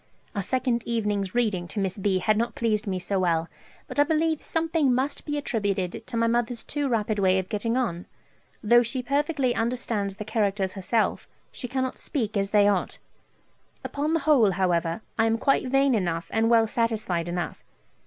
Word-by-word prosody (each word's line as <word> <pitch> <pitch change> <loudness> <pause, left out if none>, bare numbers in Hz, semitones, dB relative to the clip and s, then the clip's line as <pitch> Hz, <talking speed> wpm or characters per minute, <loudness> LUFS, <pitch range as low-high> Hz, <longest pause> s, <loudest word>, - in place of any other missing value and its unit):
Our 200 - 0
second 250 +2 0
evening's 210 -4 -1
reading 210 -7 0
to 205 - -4
Miss 195 0 -1
B. 195 -1 +1
had 215 +4 +2
not 235 +1 -1
pleased 220 -2 0
me 190 -1 -1
so 190 +2 -1
well, 165 -3 +1 0.4
but - - -4
I - - +8
believe 315 0 +1
something 325 -4 +1
must 265 +3 -1
be 295 -1 -2
attributed 205 -7 -2
to 235 - -3
my 230 - +2
mother's 235 0 0
too 290 -1 -2
rapid 215 -3 0
way 190 -1 +3
of 185 -1 -2
getting 230 +3 -1
on: 180 -9 -2 0.6
though 240 +3 +6
she 250 +2 -2
perfectly 280 -1 +1
understands 225 -4 -2
the 210 - -6
characters 200 -3 0
herself, 205 +4 0 0.2
she 250 - -6
cannot 260 0 -2
speak 220 -7 -2
as 195 -1 0
they 205 -1 +4
ought. 200 -3 0 0.9
Upon 300 +3 -1
the 330 - +1
whole, 270 -9 +4
however, 175 -1 0 0.2
I 225 - +4
am 225 0 +2
quite 275 +2 +2
vain 270 +1 +3
enough 170 -6 -1
and 225 0 +2
well 230 -1 +5
satisfied 215 -7 -1
enough. 175 -1 -4
225 Hz, 185 wpm, -26 LUFS, 195-255 Hz, 0.9 s, I